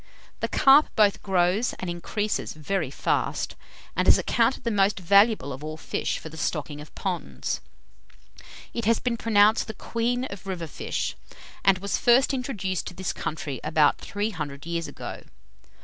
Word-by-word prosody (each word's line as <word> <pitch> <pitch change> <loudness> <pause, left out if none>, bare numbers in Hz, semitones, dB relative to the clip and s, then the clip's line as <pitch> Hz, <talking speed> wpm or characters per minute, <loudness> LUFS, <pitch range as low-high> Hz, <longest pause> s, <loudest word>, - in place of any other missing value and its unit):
The - - -1
carp 275 +3 +6
both 205 -2 +4
grows 190 +4 +1
and 185 - -6
increases 205 +5 -2
very 155 0 -2
fast, 140 - -1 0.4
and - - +1
is - - +8
accounted 235 +2 +1
the 235 - 0
most 200 -1 +2
valuable 200 - +4
of 135 +3 -9
all 155 0 -5
fish - - -2
for 160 - -8
the 160 - -11
stocking 150 -2 -3
of 150 - -13
ponds. 185 -3 -3 1.1
It 235 - -3
has 230 +1 +4
been 245 -2 -1
pronounced 215 -1 +4
the 220 - -6
queen 240 +4 -1
of 200 -5 -8
river 180 -3 -3
fish, 155 - -3 0.5
and 195 -1 +5
was 200 +1 -2
first 255 +3 +4
introduced 210 -9 -2
to 180 - -7
this 190 0 -3
country 145 -4 -4
about 155 -1 +3
three 205 +2 -3
hundred 145 -5 -6
years 170 -1 -2
ago. - - -7
195 Hz, 165 wpm, -26 LUFS, 160-225 Hz, 1.1 s, is